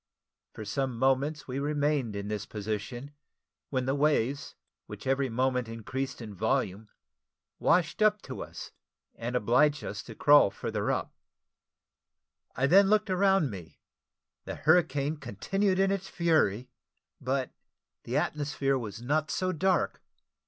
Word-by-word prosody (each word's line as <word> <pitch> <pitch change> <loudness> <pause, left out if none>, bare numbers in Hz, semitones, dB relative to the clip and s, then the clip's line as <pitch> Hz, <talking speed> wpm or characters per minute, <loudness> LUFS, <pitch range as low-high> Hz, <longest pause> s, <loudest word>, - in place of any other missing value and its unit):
For 110 - -7
some 130 +3 -2
moments 135 +4 +1
we 130 +1 -3
remained 145 -5 0
in 100 0 -4
this 105 -1 -4
position, 110 +6 -5 0.6
when 130 -2 -1
the 135 - +1
waves, 140 -2 0 0.3
which - - -9
every 135 0 +1
moment 125 +1 0
increased 130 +3 -5
in 105 -2 -8
volume, 110 -1 -1 0.7
washed 170 +2 +2
up 210 0 +4
to - - -7
us, - - -8 0.4
and 120 +2 -5
obliged 130 +6 +3
us - - -5
to - - -11
crawl 145 -7 +6
further - - -3
up. - - -1 1.4
I 130 - +1
then 195 +7 +6
looked 210 -2 +2
around 190 -5 +3
me; 90 -5 -10 0.7
the - - -5
hurricane 150 -2 +2
continued 190 - -1
in 195 0 +3
its 195 -1 -3
fury, 130 - +1 0.5
but 130 0 -1 0.5
the - - -2
atmosphere 140 -2 0
was 110 -1 -7
not 150 +4 0
so 185 0 0
dark. 185 +1 0
135 Hz, 135 wpm, -29 LUFS, 115-155 Hz, 1.4 s, crawl